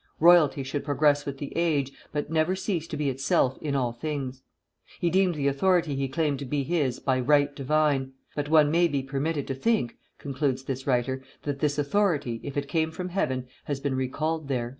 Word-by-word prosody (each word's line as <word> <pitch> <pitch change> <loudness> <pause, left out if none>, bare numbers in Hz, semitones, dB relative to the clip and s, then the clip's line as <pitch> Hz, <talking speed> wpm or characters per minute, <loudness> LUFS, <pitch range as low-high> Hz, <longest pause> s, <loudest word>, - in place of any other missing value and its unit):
Royalty 160 -4 +6
should 135 +2 -3
progress 145 0 +2
with 140 -1 -4
the 140 0 -7
age, 150 -5 +1 0.2
but 150 +1 -3
never 160 +3 +2
cease 185 -4 -2
to 155 - -5
be 150 -1 -1
itself 130 0 +1
in 145 -2 -2
all 125 -3 +1
things.' 135 -1 -4 0.6
He 170 - +1
deemed 185 -1 +3
the 140 -2 0
authority 165 +1 +2
he 135 0 -1
claimed 140 0 0
to 140 - -5
be 140 +2 -1
his 145 -5 0
by 130 -1 0
right 145 +2 +3
divine; 140 -1 +1 0.2
but 145 0 -2
one 155 -2 +5
may 170 +2 +4
be 140 -4 -1
permitted 140 +2 -2
to 135 - -3
think," 135 - 0 0.2
concludes 135 -2 -2
this 135 0 -5
writer, 130 0 +1 0.2
"that 145 -1 -3
this 145 0 0
authority, 145 - +1
if 140 0 -6
it 140 0 -1
came 160 +2 +1
from 180 +3 -5
Heaven, 130 -9 -1 0.2
has 145 -2 -2
been 140 -1 -1
recalled 150 +4 -2
there." 125 -3 -1
145 Hz, 200 wpm, -27 LUFS, 135-155 Hz, 0.6 s, Royalty